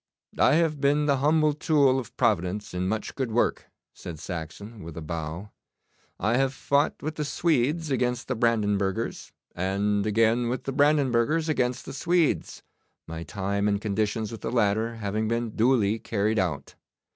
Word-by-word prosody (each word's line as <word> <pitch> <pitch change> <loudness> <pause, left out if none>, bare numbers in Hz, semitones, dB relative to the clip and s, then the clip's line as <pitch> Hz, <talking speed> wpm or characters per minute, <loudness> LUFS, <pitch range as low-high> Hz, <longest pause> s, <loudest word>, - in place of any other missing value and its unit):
'I - - +5
have 160 -3 +1
been 145 +1 +3
the 140 -2 +2
humble 155 +2 +3
tool 145 -4 +3
of 120 -1 -9
Providence 105 -4 0
in 90 +1 -1
much 110 +2 -2
good 130 -3 -2
work,' 120 +2 0 0.2
said 85 - -8
Saxon, 90 +7 -7
with 80 -1 -9
a - - -4
bow. 80 +5 -5 0.7
'I 115 +3 +1
have 135 0 +1
fought 140 +3 +1
with 155 +1 -4
the 150 - -1
Swedes 150 +1 0
against 125 -1 0
the 130 - -1
Brandenburgers, 105 -2 0 0.2
and 100 +3 0
again 115 +3 +2
with 125 +1 -3
the 135 - -3
Brandenburgers 145 +1 +2
against 125 -5 0
the - - -7
Swedes, 170 +2 0 0.4
my 80 0 -7
time 100 +5 -2
and 100 -1 +1
conditions 105 +1 -1
with 115 - -8
the 115 - -3
latter 110 0 +1
having 110 0 -2
been 115 0 -1
duly 110 -2 +2
carried 110 0 0
out. 75 -7 -2
115 Hz, 160 wpm, -26 LUFS, 100-135 Hz, 0.7 s, I